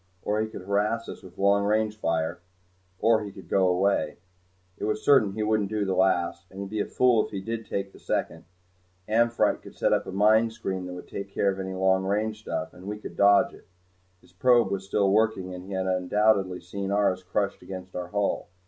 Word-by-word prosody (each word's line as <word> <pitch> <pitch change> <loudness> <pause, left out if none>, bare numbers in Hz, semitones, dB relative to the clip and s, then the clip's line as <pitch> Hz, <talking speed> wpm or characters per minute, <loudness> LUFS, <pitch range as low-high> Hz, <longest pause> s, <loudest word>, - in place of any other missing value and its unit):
Or 105 +1 0
he 110 - -1
could 110 - -9
harass 105 +4 0
us - - -8
with 90 -1 -14
long 100 +1 +3
range 110 +1 +1
fire. 80 -6 -1 0.6
Or 110 0 +3
he 100 - -7
could - - -13
go 95 -1 +3
away. 90 -4 +1 0.6
It - - -2
was 105 0 -2
certain 120 -9 +5
he 110 +1 -2
wouldn't 105 -2 +1
do 105 -1 -1
the 95 - 0
last, 95 -1 +1
and 95 - -11
he'd 100 0 -6
be 110 - -2
a - - -1
fool 125 -4 +3
if - - -7
he 100 - -4
did 115 +3 -5
the 100 0 -4
second. - - -3 0.6
"Amphitrite" 115 +2 +2
could - - -13
set - - +2
up - - 0
a - - -5
mine 110 +4 +4
screen 95 -4 -4
that 90 - -6
would 90 - -9
take 100 0 -6
care 100 0 +1
of 95 - -6
any 95 0 -4
long 95 0 +2
range 105 +2 -1
stuff, 90 - -4
and 90 +2 -12
we 105 +1 -4
could 105 - -9
dodge 100 0 +5
it. - - -17 0.5
His 90 0 -23
probe 120 +1 +3
was 95 -1 -3
still 100 -1 +2
working 105 -3 +1
and 90 0 -8
he 100 - -7
had 95 0 -1
undoubtedly 95 0 +1
seen 95 +2 -5
ours 100 -2 +1
crushed 100 +2 -2
against 95 -1 -9
our 90 -1 -4
hull. 100 0 -1
100 Hz, 220 wpm, -26 LUFS, 95-110 Hz, 0.6 s, certain